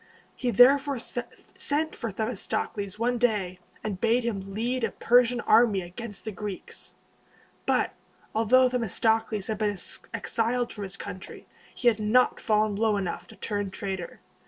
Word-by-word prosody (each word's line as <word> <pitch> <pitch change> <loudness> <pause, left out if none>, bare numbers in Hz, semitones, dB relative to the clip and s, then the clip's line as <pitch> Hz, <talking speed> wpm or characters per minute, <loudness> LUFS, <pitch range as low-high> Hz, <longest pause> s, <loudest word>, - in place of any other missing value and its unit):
He 250 - -1
therefore 270 +5 +5
sent 285 +6 -3
for 230 -3 -4
Themistocles 205 -1 -3
one 240 +2 0
day, 205 -7 0 0.2
and 200 -4 -4
bade 235 +2 +3
him 195 -4 -4
lead 240 +3 -1
a - - +2
Persian 245 0 +3
army 215 -5 +4
against 205 +5 -7
the 220 - -3
Greeks. 205 -1 -7 0.7
But, - - +2 0.4
although 245 +4 +5
Themistocles 225 -3 0
had 220 - -3
been 205 -2 0 0.3
exiled 235 +1 -1
from 205 -2 -5
his 195 +1 -7
country, 185 - -8 0.3
he 245 - 0
had 225 -2 +4
not 220 +4 +3
fallen 215 -2 +2
low 215 -1 +2
enough 190 -3 -3
to - - -14
turn 205 -2 -2
traitor. 190 -2 -5
220 Hz, 145 wpm, -27 LUFS, 200-245 Hz, 0.7 s, therefore